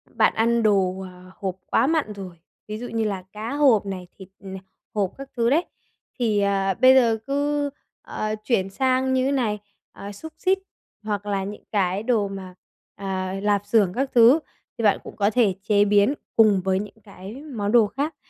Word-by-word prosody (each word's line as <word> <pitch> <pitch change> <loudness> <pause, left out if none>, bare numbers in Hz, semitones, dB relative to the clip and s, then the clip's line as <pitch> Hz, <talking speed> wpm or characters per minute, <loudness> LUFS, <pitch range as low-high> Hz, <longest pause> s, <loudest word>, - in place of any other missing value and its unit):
Bạn - - +4
ăn 230 +1 +2
đồ, 190 -3 +2
ờ, 185 0 -11
hộp 190 -2 -3
quá - - +2
mặn 310 -10 0
rồi, 185 -4 -9 0.3
ví 215 0 -5
dụ 245 +2 -6
như 225 -1 -2
là 195 -3 -3
cá 220 +5 -5
hộp 265 -9 +4
này, 185 -2 -6
thịt, 190 -1 -11
ờ, 195 - -8 0.5
hộp 195 -3 0
các 275 0 -9
thứ 235 0 +2
đấy. 320 +6 +2 0.5
Thì, 215 -4 +1
ờ, 195 -1 +1
bây 260 +1 +8
giờ 230 -3 +4
cứ, 285 +1 0 0.3
ờ, 215 0 -3
chuyển 195 -5 0
sang 260 +4 +1
như 260 +1 +1
này, 220 -6 0 0.3
ờ, 200 +1 -9
xúc 320 +11 -10
xích 385 +1 +1 0.4
hoặc 205 -1 -3
là 200 -2 -1
những 205 +1 -7
cái 195 -1 0
đồ 220 -4 +1
mà, 190 -2 -8 0.4
ờ, 190 -1 -3
lạp 205 -1 +1
xưởng 205 -4 +2
các 270 +1 -2
thứ 240 +7 +7 0.4
thì 230 - -4
bạn 205 - +4
cũng - - -10
có 205 -1 +2
thể 215 -4 +2
chế 205 -1 +3
biến 205 +5 +4 0.2
cùng 210 -4 +5
với 190 0 +1
những 210 +2 -8
cái 195 +1 -10
món 225 -9 -3
đồ 230 -3 +5
khác. 285 +7 -3
210 Hz, 195 wpm, -23 LUFS, 195-245 Hz, 0.5 s, bây